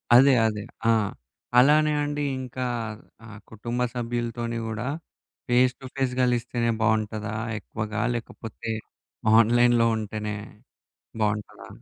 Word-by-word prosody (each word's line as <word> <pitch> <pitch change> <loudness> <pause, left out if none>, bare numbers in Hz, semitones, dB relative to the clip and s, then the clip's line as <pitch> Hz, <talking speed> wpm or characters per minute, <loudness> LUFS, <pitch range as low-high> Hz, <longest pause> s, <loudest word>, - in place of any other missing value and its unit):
అదే, 135 +2 +8
అదే. 105 -2 -3 0.3
ఆ! - - +7 0.7
అలానే 150 +3 +5
అండి 145 0 -2 0.2
ఇంకా, 130 0 -4 0.6
ఆహ్, 105 -2 -11
కుటుంబ 120 +3 -3
సభ్యులుతోని 120 -1 -3
కూడా, 110 +3 -3 0.6
ఫేస్ 125 +1 +4
టు 130 - -11
ఫేస్ 135 -2 0
గలిస్తేనే 120 -1 +1
బాగుంటదా 110 -1 0 0.3
ఎక్కువగా? 110 -1 -4
లేకపోతే 115 -1 -6 0.7
ఆన్‌లైన్‌లో 120 0 +4
ఉంటేనే 105 0 -4 0.9
బాగుంటరా? 105 0 -2
120 Hz, 100 wpm, -26 LUFS, 110-125 Hz, 0.9 s, అదే